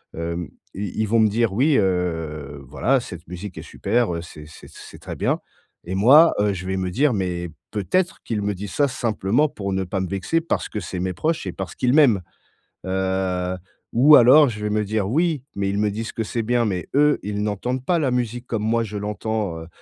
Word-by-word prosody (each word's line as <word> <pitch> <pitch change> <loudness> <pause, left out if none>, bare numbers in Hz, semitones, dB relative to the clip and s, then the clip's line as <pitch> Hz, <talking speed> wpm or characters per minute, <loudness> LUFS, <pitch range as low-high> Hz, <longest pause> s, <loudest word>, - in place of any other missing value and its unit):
hem, 85 +1 -4 0.3
i 100 -1 -4
ils - - +2
vont 115 +2 +3
me 110 - +5
dire: 115 0 +1
«Oui 140 +8 +3
heu, 80 -7 -2
voilà, 135 - +2
cette 90 -6 -10
musique 90 +3 -8
est - - -5
super. 120 -8 -1
Heu, 85 - -4
c'est 75 -3 -11
c'est 75 - -14
c'est - - -12
très - - -7
bien», - - 0 0.5
et 90 +2 -4
moi, 140 - +7
heu, 105 -1 +2
je 90 -1 -6
vais 95 0 -1
me 95 -1 -2
dire: 140 +8 +2
«Mais 90 -3 -2 0.2
peut-être 170 - -1
qu'ils 110 -3 -2
me 100 0 -1
disent 100 +1 -7
ça 145 -1 +3
simplement 120 +2 0
pour 100 -6 -4
ne 95 0 0
pas 95 +1 -3
me 95 - -2
vexer 100 - 0
parce 165 - -2
que 105 - -4
c'est 90 +2 -5
mes 90 +1 -2
proches 155 - -1
et - - -2
parce 95 -1 -6
qu'ils 125 0 +1
m'aiment». 135 -10 +5 0.6
Heu, 95 -1 -1 0.4
ou 145 +6 +7
alors, 130 +5 +7
je 105 -3 -7
vais 105 - -1
me 105 0 0
dire: 105 -1 -1
«Oui, 155 +1 +1
mais 100 -1 -1
ils 100 - -1
me 105 0 +1
disent 110 +2 -5
que 115 - -2
c'est 115 +2 -3
bien, 120 +2 +1
mais 95 -4 -2
eux, 150 +1 +4
ils 105 0 -3
n'entendent 120 +5 -2
pas 175 -2 +2
la 145 -4 +1
musique 120 0 -2
comme 110 -3 -2
moi, 115 +1 +1
je 105 -1 -6
l'entends», 105 -3 -3
heu 80 - -10
105 Hz, 225 wpm, -22 LUFS, 95-120 Hz, 0.6 s, moi